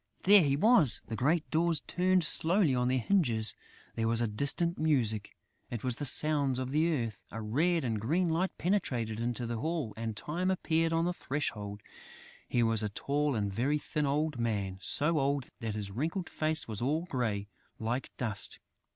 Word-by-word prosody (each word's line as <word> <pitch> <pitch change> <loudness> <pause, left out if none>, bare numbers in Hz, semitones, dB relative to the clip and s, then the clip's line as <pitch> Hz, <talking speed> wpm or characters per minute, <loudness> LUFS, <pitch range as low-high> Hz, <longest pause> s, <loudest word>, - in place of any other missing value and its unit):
There 200 +1 +8
he 140 -3 +2
was! 180 - +4
The 115 - -5
great 150 +8 +1
doors 165 -1 +1
turned 185 0 +2
slowly 165 0 +3
on 125 -1 +1
their 130 +1 +2
hinges. 120 - +1 0.4
There 115 0 -1
was 115 0 +3
a 120 - +1
distant 140 +10 -1
music: 120 -9 0 0.3
it 120 -3 -5
was 125 -2 0
the 145 - -3
sounds 140 -2 +3
of 130 0 -3
the 160 +4 +2
earth. 115 - -2
A 115 - -6
red 155 +11 +1
and 110 -4 -2
green 170 - +1
light 170 +4 +1
penetrated 125 - -1
into 120 +1 -2
the 115 -1 -3
hall; 155 -5 -2
and 110 -1 -4
Time 175 - -2
appeared 165 -3 +1
on 165 0 +1
the 180 - 0
threshold. 105 -10 -4 0.7
He 120 - +2
was 115 -1 +3
a 105 - -1
tall 145 +6 -1
and 100 -3 -1
very 135 +8 +1
thin 150 0 -2
old 150 -1 0
man, 100 -5 -2
so 150 - +3
old 140 -1 -1
that 110 -3 -3
his 100 -2 -4
wrinkled 160 - -3
face 155 0 -1
was 110 -1 -5
all 150 +7 0
grey, 115 - -2 0.3
like 120 +4 -2
dust. 105 -4 -3
135 Hz, 185 wpm, -31 LUFS, 115-160 Hz, 0.7 s, There